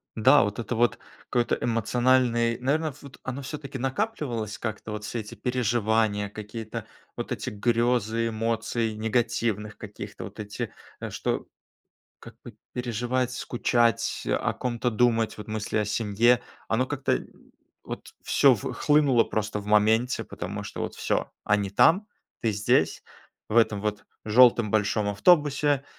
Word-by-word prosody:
Да, 130 +6 +6
вот 105 +2 -3
это 120 +1 -3
вот 120 +1 +2 0.3
какой-то 120 -1 +1
эмоциональный 120 0 +2
наверно 150 +3 0
вот 140 -2 -13
оно 130 +2 -4
всё-таки 140 -1 -6
накапливалось 130 - -2
как-то 110 -1 -5
вот 105 0 -5
все 115 +2 -4
эти 105 - -8
переживания 110 -4 +1
какие-то, 110 +1 -7 0.3
вот - - -5
эти - - -3
грёзы 115 +1 +1
эмоций 115 0 -1
негативных 110 -1 -1
каких-то. 100 -1 -8
Вот 105 +1 -11
эти, 105 -1 -5 0.3
э, - - -5
что, - - -2 0.7
как - - -13
бы, - - -10 0.2
переживать, 125 +1 -1
скучать, 120 -3 0
о - - +1
ком-то 120 0 -2
думать, 115 -1 +2
вот 105 - -8
мысли 110 0 -3
о 105 - +1
семье, 110 +3 +2 0.3
оно 125 +3 +1
как-то 145 -1 0 0.6
вот - - -7
всё - - +5
в - - -5
хлынуло 145 -5 +3
просто 105 -1 -2
в 100 - -12
моменте. 110 +4 +3
Потому - - -6
что, - - -7
вот - - -3
всё, - - -1
они 100 -2 +1
там, 180 - +4 0.3
ты 115 -3 +1
здесь, 100 -5 +1 0.5
в 110 - -2
этом 110 -3 +4
вот 105 0 -3 0.2
жёлтом 115 -1 +5
большом 105 -1 +1
автобусе. 145 - +3
115 Hz, 140 wpm, -26 LUFS, 105-125 Hz, 0.7 s, Да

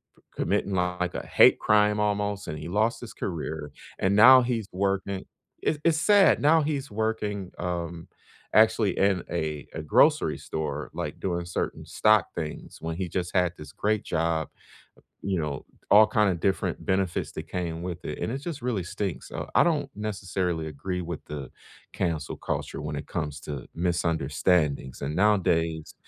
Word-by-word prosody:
p - - -26
committing, 100 - 0
like, 90 0 -1
a - - -4
hate - - +6
crime 105 0 +3
almost, 105 -1 -1
and 75 0 -5
he 75 - -7
lost 110 +5 +1
his 120 - -8
career 80 -4 -4 0.3
and 95 +1 +2
now 130 +5 +9
he's 115 -4 -2
working 95 0 -1 0.4
I 155 - +2
it's 165 -2 +3
sad! 200 +4 +5
Now 160 +2 +5
he's 145 -3 -2
working, 105 -3 -2
um, 85 -1 -4 0.5
actually 110 -2 +4
in 95 -2 +2
a 75 -3 -3
a 80 - -4
grocery 75 - +4
store, 75 -2 -4
like, - - -5
doing 85 -2 -2
certain 85 - -3
stock 110 -5 +3
things 75 -2 -6
when 80 0 -3
he 95 -1 -2
just 90 0 -3
had 90 -2 +3
this 75 - -10
great 110 0 0
job, 80 -1 0 0.8
you 95 -2 -1
know, 75 -2 -4 0.3
all 105 +1 +8
kind 105 -2 +2
of 85 -3 -3
different 95 -1 -1
benefits 95 -2 0
that - - -6
came 85 -2 -3
with 90 -1 -5
it, - - -5
and - - -2
it 130 - -2
just 150 0 -6
really 120 -6 -1
stinks. 90 -6 -4
Uh, - - -4
I - - +6
don't 155 -5 +1
necessarily 95 -5 -2
agree 90 +5 -4
with 85 -2 -6
the 70 -3 -6 0.4
cancel 80 -5 -2
culture - - -4
when 75 0 -4
it 70 - -6
comes 75 -4 -3
to 70 -4 -6
misunderstandings, 80 -4 0
and 75 +3 -3
nowadays, 85 -6 +1
90 Hz, 170 wpm, -27 LUFS, 80-105 Hz, 0.8 s, now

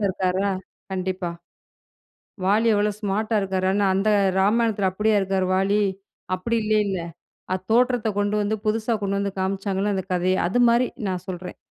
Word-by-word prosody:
இருக்காரா? 190 +1 0 0.4
கண்டிப்பா. 185 -1 -2 1.2
வாலி 210 +4 +3
எவ்வளோ 210 +1 +2
ஸ்மார்ட் 210 +1 -1
டா 220 - +4
இருக்காரு, 190 -1 -1 0.3
அந்த 195 +3 +1 0.3
ராமாயணத்தில 210 -1 +2
அப்படியா 210 +3 +1
இருக்காரு 190 -1 0
வாலி? 195 +2 +2 0.6
அப்டி 230 +6 -1
இல்லைல்ல. 210 -3 +1 0.5
அது 185 - -1
தோற்றத்த 245 -1 +3
கொண்டு 205 0 +1
வந்து 210 +1 0
புதுசா 220 +2 0
கொண்டு 200 0 0
வந்து 200 0 -2
காமிச்சாங்கள்ல 195 +1 -1
அந்த 190 - -2
கதைய. 180 +1 +1
அது 220 +7 0
மாதிரி. 240 +2 +3 0.2
நான் 185 -1 -3
சொல்றேன். 180 -1 -6
200 Hz, 145 wpm, -23 LUFS, 190-215 Hz, 1.2 s, டா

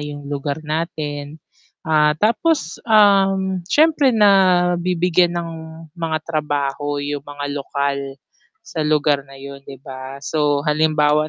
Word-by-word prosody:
yung 145 -1 -7
lugar 145 +2 -4
natin. 150 -2 -4 0.5
Ah 150 -1 +3
tapos, 230 - 0
um, 195 -3 +4
siyempre 300 -2 +4
nabibigyan 180 -4 +3
ng 170 -1 -3 0.4
mga 165 -2 -3
trabaho 145 -2 -2
yung 145 0 -3
mga 145 0 -8
lokal 140 -1 -3 0.5
sa 165 - -5
lugar 150 -2 +2
na 135 - -13
yun 140 0 -10
'di 135 - -8
ba? 130 0 -8
So 145 -2 0
halimbawa 150 0 +2
155 Hz, 115 wpm, -20 LUFS, 145-180 Hz, 0.5 s, um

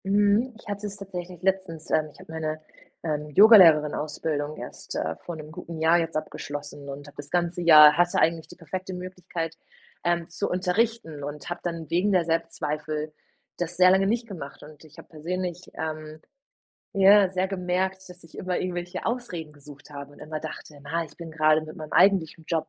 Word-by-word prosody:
Mhm. 205 +5 +3
Ich - - -17
hatte 205 0 -4
es 200 - -6
tatsächlich 180 -3 -7
letztens. 185 -4 -1
Ähm, 155 -1 +2
ich - - -19
habe - - -12
meine, 155 -1 -3 0.4
ähm, 150 -2 -2
Yogalehrerin-Ausbildung 155 -5 +5
erst, - - -8
äh, 80 +1 -2
vor 170 - -7
'nem 155 -1 -9
guten 165 0 -8
Jahr 165 +2 +4
jetzt 165 -1 -3
abgeschlossen 145 -1 -6
und 140 +1 -8
hab 145 - -14
das 145 0 -9
ganze 175 0 0
Jahr 150 -3 +9
hatte 175 0 +3
eigentlich 165 -1 +1
die - - -13
perfekte 185 +3 -6
Möglichkeit, 180 -3 -5 0.5
ähm, 170 -1 0
zu 170 - -3
unterrichten 180 -4 -1
und 145 +1 -6
habe 175 - -4
dann 165 -3 -4
wegen 180 +5 +2
der 180 -3 +3
Selbstzweifel 155 -2 -2 0.4
das 175 0 -4
sehr 185 0 +7
lange 190 +1 +4
nicht 230 +2 0
gemacht. 160 -9 -9
Und 150 0 -14
ich 155 -1 -18
habe - - -12
persönlich, 180 +3 -5
ähm, 155 0 -5 0.8
ja, 195 0 +7
sehr 185 +1 -1
gemerkt, 190 0 -2
dass 180 0 -13
ich 165 - -14
immer 185 -1 -2
irgendwelche 180 0 -4
Ausreden 185 -10 -4
gesucht 145 0 -15
habe 140 -1 -9
und - - -17
immer 155 +1 -5
dachte: 150 -1 -9
„Na, 165 +4 -2
ich 150 -2 -16
bin 165 -2 -9
gerade 155 0 +4
mit 155 0 -9
meinem 155 -1 -8
eigentlichen 170 -5 +3
Job 160 -2 -1
165 Hz, 185 wpm, -26 LUFS, 155-185 Hz, 0.8 s, Jahr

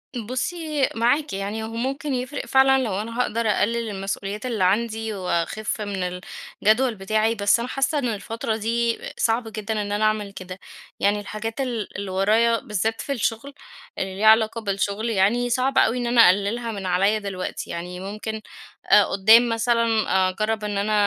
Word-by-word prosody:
بُصّي 280 +5 -2
معاكِ، 260 +6 +1
يعني 200 +3 -3
هو 220 - -4
ممكن 265 +5 -3
يفرِق 255 +3 -3
فعلًا 265 0 +4
لو 205 -4 -2
أنا 230 +2 -6
هاقدر 230 -2 0
أقلّل 230 +2 0
المسؤوليات 200 +2 -4
اللي 230 -6 -1
عندي 220 +3 0
وأخِف 190 +3 -2
من 180 -3 -3 0.4
الجدول 225 +3 +3
بتاعي، 215 +3 0
بس 205 +1 +3
أنا 235 - -3
حاسّة 275 +3 0
إن 250 - -1
الفترة 225 +1 -3
دي 230 +1 0 0.2
صعب 225 +1 +1
جدًا 215 0 -3
إن 205 - -4
أنا 205 +1 0
أعمل 215 -2 0
كده، 185 -1 -9 0.4
يعني 205 +1 +2
الحاجات 220 +5 -5
ال 235 -8 -4
اللي 195 -1 -5
ورايا 220 +4 +3
بالذات 220 +2 -2
في 280 - -5
الشغل، 245 +2 -2 0.4
اللي 190 0 -3
ليها 215 - 0
علاقة 220 +1 +4
بالشغل 200 +2 -1
يعني، 230 +4 +2
صعب 255 +2 0
أوي 240 - +4
إن 245 -1 -2
أنا 235 0 +5
أقلّلها 205 +5 +1
من 200 -3 -6
عليّا 195 +4 +2
دلوقتي، 195 -3 -5
يعني 180 +1 -6
ممكن 215 +3 -5 0.5
آآ 210 - +8
قدّام 225 +5 +5
مثلًا 230 0 +1 0.4
أجرّب 215 +3 -2
إن 205 -1 -2
أنا 210 +2 0
220 Hz, 170 wpm, -23 LUFS, 200-235 Hz, 0.5 s, آآ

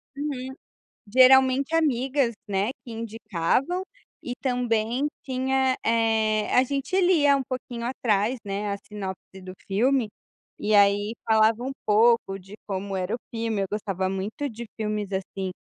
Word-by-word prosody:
Uhum. 265 -3 -4 0.5
Geralmente 260 +5 +5
amigas, 265 -5 +1
né, 200 +3 0
que 240 - -10
indicavam 225 - -1 0.4
e 245 - -4
também 245 0 0 0.2
tinha, 260 0 0
eh, 220 -1 +1
a 255 - +6
gente 280 +8 -1
lia 305 -6 +4
um 270 - -1
pouquinho 245 -2 -5
atrás, 235 -1 0
né, 200 +1 -3
a - - -2
sinopse 190 -2 -8
do 185 0 -9 0.2
filme, 240 +3 +2 0.5
e 210 0 0
aí 205 +1 +4
falava 220 +1 +3
um 265 - -3 0.2
pouco 215 -2 +3
de 195 +2 -13
como 195 0 -3
era 185 +4 -2
o - - -3
filme. 225 -3 -2
Eu - - -1
gostava 195 -3 -2
muito 200 +9 -3
de 230 +1 -8
filmes, 210 -2 -3
assim, 190 0 -3
225 Hz, 140 wpm, -25 LUFS, 205-260 Hz, 0.5 s, a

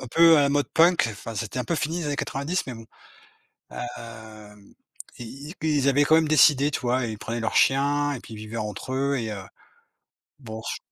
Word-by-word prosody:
un 130 - -6
peu 165 +2 +6
à 145 - +4
la 140 - +3
mode 145 0 0
punk, 170 -4 +4
enfin, 110 +2 -8
c'était 115 +3 -4
un 125 - -2
peu 170 - -1
fini 160 +1 -2
dans - - -2
les 150 - -3
années 145 - -2
90, 145 +9 -2
mais 130 - -6
bon, 115 -1 -11 0.9
hem, 110 -4 -10 0.5
i 140 +7 -9
ils 160 - -1
ils 140 -3 +2
avaient 145 +2 +3
quand 160 - +5
même 160 -1 +3
décidé, 150 -2 +5
tu - - -2
vois? 125 +1 0
Ils 110 -2 -5
prenaient 115 +2 -4
leurs 115 - -2
chiens, 145 +2 +3
et 130 - -5
puis 115 - -12
ils - - -10
vivaient 110 +2 -7
entre 105 +4 -5
eux, 140 +1 0
et 110 -2 -4
heu, 100 -2 -6 1.0
b 120 - -14
oh 110 0 -6
ch - - -3
130 Hz, 230 wpm, -25 LUFS, 115-145 Hz, 1.0 s, peu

